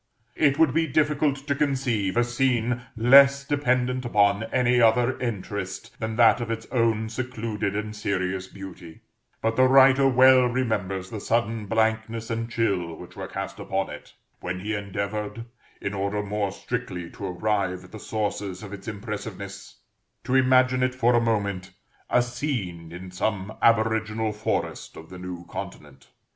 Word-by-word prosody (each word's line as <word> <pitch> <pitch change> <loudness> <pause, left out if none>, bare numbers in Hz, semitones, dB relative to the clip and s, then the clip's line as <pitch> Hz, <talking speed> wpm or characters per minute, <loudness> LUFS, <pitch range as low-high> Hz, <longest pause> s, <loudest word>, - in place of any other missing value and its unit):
It 140 -2 +3
would 160 -4 +4
be 165 +1 +2
difficult 150 0 +2
to 145 - +1
conceive 130 -9 0
a 120 - +5
scene 120 -1 0 0.2
less 140 +4 +6
dependent 125 -3 0
upon 105 -2 +2
any 125 0 +2
other 120 +3 +4
interest 100 -5 -5
than 110 0 -3
that 120 +1 +5
of 120 - -4
its 115 0 -3
own 115 -2 +1
secluded 110 -4 -3
and 105 0 -3
serious 95 -2 -2
beauty; 95 -4 -11 0.4
but 115 0 +1
the 130 0 +6
writer 135 +1 +6
well 130 0 +6
remembers 105 -7 -2
the 110 - -4
sudden 115 -1 -1
blankness 110 +1 0
and 115 0 -2
chill 95 -8 -1
which - - -12
were - - -6
cast - - -6
upon 95 0 -2
it - - -11 0.2
when 90 +1 -4
he 105 +3 -3
endeavored, 105 +2 -4 0.3
in 100 - -4
order 100 +1 -1
more 105 -1 -2
strictly 90 -2 -5
to 100 - -6
arrive 95 -1 -1
at 90 - -15
the 110 - -9
sources 105 -3 -3
of 100 -1 -8
its 100 +2 -9
impressiveness, 100 -2 -7 0.4
to 125 - -3
imagine 130 -1 +4
it, 130 0 +1
for 125 -1 +3
a 120 - +4
moment, 100 -5 -1 0.4
a 125 - +4
scene 120 - -4
in 90 +2 -9
some 100 +2 -2
aboriginal 110 -1 +2
forest 105 +1 -3
of 80 +2 -12
the 90 - -9
New 90 -1 -7
Continent. 75 -4 -9
110 Hz, 155 wpm, -25 LUFS, 100-125 Hz, 0.4 s, less